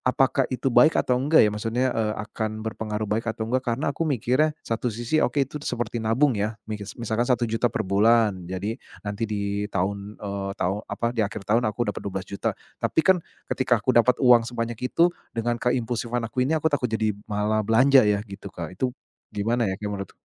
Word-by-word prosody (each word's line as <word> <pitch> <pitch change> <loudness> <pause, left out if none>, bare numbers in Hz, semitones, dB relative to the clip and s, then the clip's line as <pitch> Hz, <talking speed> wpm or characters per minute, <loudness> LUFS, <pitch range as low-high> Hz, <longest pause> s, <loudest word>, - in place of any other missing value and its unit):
apakah 130 +1 +2
itu 130 +1 -1
baik 155 +5 +6
atau 125 -1 +2
enggak 150 +4 +5
ya? 105 - +3
Maksudnya 115 +4 0
e 115 - 0 0.2
akan 110 0 -4
berpengaruh 110 -1 -3
baik 115 +2 -1
atau 110 - -3
enggak? 130 +1 +1
Karena 140 +3 -1
aku 165 - -3
mikirnya 135 +4 +1
satu 115 +2 -2
sisi 120 +7 -1
oke 140 - +2
itu 150 +3 -7
seperti 120 -3 -3
nabung 120 +6 +3
ya? 105 +2 -1 0.2
Mikes 105 -1 -5
misalkan 115 0 -1
Rp1.000.000 120 -1 +1
per 110 - -2
bulan, 100 -2 +3
jadi 100 +6 -3 0.3
nanti 105 +2 -4
di 100 0 -2
tahun 100 +2 -3
eee, 100 -1 -3
tahu 95 +2 0
apa 115 - -2
di 115 - -1
akhir 100 - -7
tahun 115 +2 +2
aku 105 +1 -1
dapat - - -6
Rp12.000.000. 95 0 -3 0.3
Tapi - - +2
kan, 190 -1 +6 0.3
ketika 120 -5 +1
aku 130 - +2
dapat 120 +1 +4
uang 120 -2 +6
sebanyak 115 -1 -3
itu 170 +5 +4 0.3
dengan 120 +1 0
keimpulsifan 120 -1 -1
aku 130 0 0
ini, 160 - +1
aku 160 0 +1
takut 130 -3 +1
jadi 110 -1 0 0.2
malah 105 +1 0
belanja 130 +4 +6
ya 105 0 +2
gitu 100 -1 -10
Kak. 85 0 -6
Itu, 130 -1 -1 0.4
gimana 115 +3 +1
ya 95 - -1
kayak 105 -1 -4
menurut 100 -1 -5
115 Hz, 195 wpm, -25 LUFS, 105-125 Hz, 0.4 s, baik